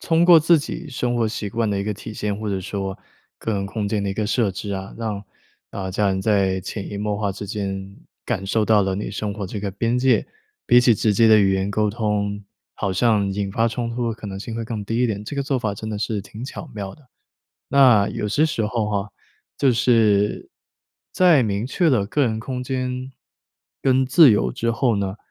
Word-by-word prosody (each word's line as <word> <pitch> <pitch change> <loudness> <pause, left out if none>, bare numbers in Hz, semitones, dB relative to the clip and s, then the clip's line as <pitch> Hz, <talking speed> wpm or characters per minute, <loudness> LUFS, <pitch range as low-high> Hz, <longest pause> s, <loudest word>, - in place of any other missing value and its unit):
通 165 0 +2
过 175 -2 +8
自 165 +1 +5
己 155 +3 -6
生 125 -2 -2
活 115 -2 +1
习 105 -2 -4
惯 115 +1 -1
的 100 -1 -1
一 100 - -2
个 105 - -1
体 105 +2 -9
现， 105 -2 -2
或 110 -1 -4
者 95 -1 -1
说 95 0 -4 0.4
个 110 - -3
人 100 -1 -2
空 105 0 -3
间 105 -1 -1
的 100 - -2
一 95 - -2
个 105 -1 -1
设 115 -2 +1
置 100 +2 -6
啊， 95 0 -6
让 110 -3 -4 0.5
呃， 95 -1 -5
家 100 +1 +1
人 95 0 0
在 95 -2 +1
潜 100 +2 -6
移 100 - -5
默 105 0 -2
化 100 -1 -1
之 100 +1 -7
间， 100 -2 -5 0.3
感 95 - -2
受 110 +2 +1
到 105 -2 +4
了 95 0 -1
你 100 - -4
生 105 -1 -3
活 100 -2 -5
这 100 +2 -5
个 100 -1 -3
边 115 +5 0
界。 130 0 +2 0.4
比 120 - +6
起 120 -2 +5
直 105 0 +1
接 115 +3 +4
的 110 -1 +7
语 100 -2 +4
言 95 +1 0
沟 105 0 +1
通， 105 -2 -2 0.3
好 95 - -2
像 105 0 +2
引 100 0 -2
发 115 +4 +1
冲 115 0 -2
突 120 0 -2
的 115 - -2
可 110 - -14
能 95 - -6
性 110 +3 -6
会 115 - -3
更 110 -3 -5
低 115 +3 -2
一 - - +4
点， 105 -1 -3
这 145 - -6
个 140 - -1
做 135 -2 -1
法 105 -4 -2
真 110 +2 -6
的 105 - -3
是 105 -1 -2
挺 110 +5 -9
巧 140 +2 -8
妙 100 -2 -6
的。 145 -5 -23 0.6
那 125 -7 +5
有 105 - -3
些 150 +9 +2
时 115 -9 -1
候 110 -1 -1
哈， 100 0 -2 0.5
就 135 -3 +3
是 110 -4 +2 0.6
在 175 -8 +5
明 105 +1 -1
确 170 +5 +1
的 120 -9 +2
个 145 +8 -2
人 110 -1 -1
空 125 +2 -4
间 130 0 -3 0.7
跟 130 0 +3
自 140 +1 +7
由 105 - +1
之 115 0 -1
后 120 0 +1
呢， 100 0 -2
105 Hz, 250 characters per minute, -22 LUFS, 100-120 Hz, 0.7 s, 过